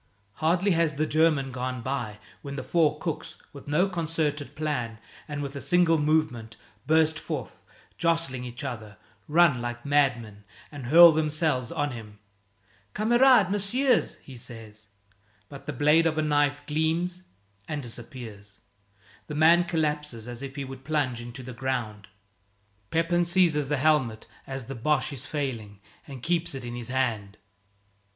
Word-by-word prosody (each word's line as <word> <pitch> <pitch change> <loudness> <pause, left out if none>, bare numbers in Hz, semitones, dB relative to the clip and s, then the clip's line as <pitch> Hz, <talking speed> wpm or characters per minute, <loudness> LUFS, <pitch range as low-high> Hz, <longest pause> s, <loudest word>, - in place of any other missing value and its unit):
Hardly 175 +5 +2
has 165 -3 +2
the 155 +2 +1
German 155 -4 +2
gone 125 -1 -4
by 120 -6 -3 0.2
when 140 0 -7
the 140 - -4
four 155 -3 +2
cooks, 160 0 -5 0.2
with 140 -1 -12
no 155 +6 +2
concerted 160 -5 -2
plan 125 -8 -2 0.3
and 145 -1 -4
with 140 0 -6
a 140 - -5
single 165 +3 +3
movement, 145 -7 0 0.3
burst 160 0 +3
forth, 145 -8 -6 0.4
jostling 165 -7 0
each 120 0 -7
other, 110 -4 -6 0.3
run 155 -5 +4
like 120 +1 -5
madmen, 125 -8 +1 0.3
and 140 -5 -7
hurl 170 +4 +9
themselves 155 -4 0
on 145 -4 -1
him. 110 -3 -9 0.8
"Kamerad, 240 -2 +5
messieurs!" 235 +6 +1
he 135 - -11
says. 110 -3 -11 0.6
But 140 +1 -11
the - - -1
blade 150 +4 +4
of 160 -1 -1
a 155 - +2
knife 145 -1 +1
gleams 165 +4 -1 0.5
and 150 -2 -4
disappears. 115 -4 -9 0.7
The 150 - -5
man 165 +3 +5
collapses 150 -8 -2
as 120 0 -7
if 135 0 -7
he 140 -2 -4
would 130 0 -9
plunge 135 -5 -1
into 120 +2 -8
the 125 +1 -8
ground. 120 -5 -3 0.8
Pepin 170 +2 +2
seizes 170 -5 +2
the 150 - +1
helmet 135 -6 +1 0.2
as 135 -2 -5
the 135 - -6
Boche 140 +3 0
is 140 +2 -6
failing 115 -10 -4 0.3
and 135 -4 -9
keeps 170 -3 0
it 130 -2 -6
in 120 - -5
his 120 -1 -6
hand. 115 -6 -1
145 Hz, 150 wpm, -27 LUFS, 125-160 Hz, 0.8 s, hurl